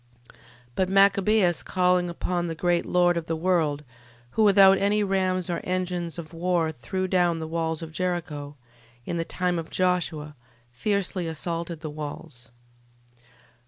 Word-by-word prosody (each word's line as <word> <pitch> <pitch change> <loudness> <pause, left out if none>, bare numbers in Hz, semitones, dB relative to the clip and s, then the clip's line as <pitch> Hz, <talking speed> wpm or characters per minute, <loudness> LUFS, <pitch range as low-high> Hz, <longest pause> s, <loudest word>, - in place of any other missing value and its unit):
12:15. - - -25 0.4
But 185 +4 0
Machabeus 195 -2 +4
calling 180 -1 +2
upon 175 0 -2
the 165 - -4
great 175 +1 0
Lord 175 -1 +3
of 165 - -4
the 165 - -1
world, 160 -4 0 0.5
who 220 - 0
without 195 -2 +7
any 205 +1 +2
rams 185 -2 0
or 175 - -2
engines 180 -2 -2
of 170 -1 -8
war 170 -1 0
threw 185 +7 -3
down 175 -2 +2
the 160 -1 -5
walls 160 0 -2
of 160 - -8
Jericho, 165 -5 -3 0.5
in 170 - -3
the 165 - 0
time 180 0 -1
of 165 - -7
Josue, 170 -5 -1 0.4
fiercely 190 - -1
assaulted 165 0 -4
the 155 -2 -5
walls. 150 -3 -8
175 Hz, 150 wpm, -25 LUFS, 160-185 Hz, 0.5 s, without